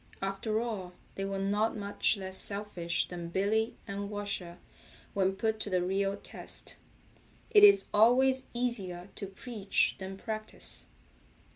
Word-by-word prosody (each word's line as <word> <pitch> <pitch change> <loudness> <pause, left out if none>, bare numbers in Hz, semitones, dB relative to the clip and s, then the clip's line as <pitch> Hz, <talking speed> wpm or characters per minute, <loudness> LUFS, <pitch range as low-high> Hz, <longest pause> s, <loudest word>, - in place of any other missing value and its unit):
After 195 +3 -1
all 210 -6 -4 0.2
they 195 - -3
were 195 0 -3
not 205 +3 0
much 205 +1 +1
less 190 -1 -4
selfish 200 -4 +2
than 175 -1 -6
Billy 215 +5 +1
and 200 0 -4
Washer 200 -4 -4 0.6
when 190 -1 +1
put 220 +2 -1
to 215 - -1
the 180 -2 +1
real 195 +2 0
test. - - -2 0.8
It 415 -1 +7
is 400 -1 +8
always 260 +4 +4
easier 200 -7 -3
to 200 - -6
preach 200 0 0
than 190 0 -6
practice. 215 +1 -4
200 Hz, 135 wpm, -31 LUFS, 190-220 Hz, 0.8 s, is